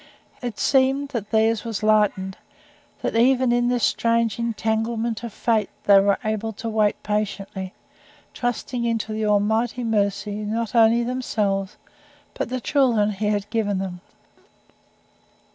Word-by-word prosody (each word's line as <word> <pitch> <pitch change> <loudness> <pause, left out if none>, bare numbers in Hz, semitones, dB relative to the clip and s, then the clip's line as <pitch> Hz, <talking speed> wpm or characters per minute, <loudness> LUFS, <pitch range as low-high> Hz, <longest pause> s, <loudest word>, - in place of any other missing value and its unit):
It 240 -4 -5
seemed 270 +1 +2
that 230 -7 -4
theirs 220 0 +2
was 225 -3 -4
lightened; 210 -3 +2 0.7
that - - -1
even 250 +1 +4
in 240 0 +2
this 245 -1 0
strange 230 -2 +1
entanglement 225 0 -1
of 235 - -5
fate 220 -1 0
they 200 -1 +7
were 200 0 +3
able 220 +1 -2
to 220 +2 -6
wait 215 -2 +1
patiently 195 -2 -3 0.6
trusting 245 0 -3
unto 225 -1 -2
the 215 0 -1
Almighty 220 +4 +1
Mercy 205 -2 0
not 215 +1 -3
only 230 0 +5
themselves 210 -6 -2 0.6
but - - -3
the 255 0 -2
children 235 -6 +2
He 210 +1 -2
had 205 -1 0
given 210 -3 0
them. 185 -2 -5
220 Hz, 135 wpm, -23 LUFS, 205-235 Hz, 0.7 s, they